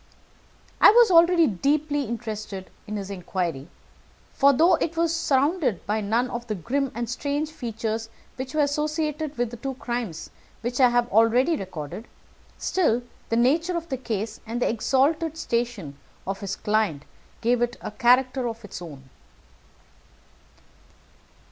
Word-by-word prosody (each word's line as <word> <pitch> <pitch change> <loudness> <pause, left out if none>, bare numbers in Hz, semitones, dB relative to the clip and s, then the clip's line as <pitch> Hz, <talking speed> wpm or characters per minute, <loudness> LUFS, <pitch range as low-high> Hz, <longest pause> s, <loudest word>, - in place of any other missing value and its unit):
I - - +10
was 465 -1 +6
already 340 0 +6
deeply 290 - 0
interested 215 -5 -6 0.2
in 210 0 -3
his 200 -1 -5
inquiry, 175 -6 -3 0.7
for, 280 +1 +5
though 325 +7 +4
it 335 0 -2
was 335 0 +2
surrounded 285 - +1
by 215 +1 0
none 225 +5 +1
of 240 0 -5
the 215 - -2
grim 260 - -1
and 235 0 -2
strange 285 +6 -2
features 225 -5 -4 0.3
which 260 +3 -6
were 310 - +3
associated 300 0 -2
with 240 -1 -1
the 240 - -7
two 265 +3 -4
crimes 240 -9 -4 0.3
which 240 +2 -3
I 255 -2 +7
have 240 0 +2
already 235 - +4
recorded, 185 - -7 0.5
still, 245 -10 +1 0.3
the 230 - +1
nature 325 +9 +2
of 335 0 -6
the 265 - -2
case 220 -3 -4
and 230 +2 -3
the - - +1
exalted 290 +7 +1
station 235 - -3 0.3
of 195 +1 -3
his 195 -1 -4
client 210 -9 0 0.4
gave 240 +1 +2
it 240 0 0
a - - -6
character 250 +3 +3
of 225 -1 -8
its 185 - -8
own. 140 -6 -10
240 Hz, 150 wpm, -25 LUFS, 215-290 Hz, 0.7 s, I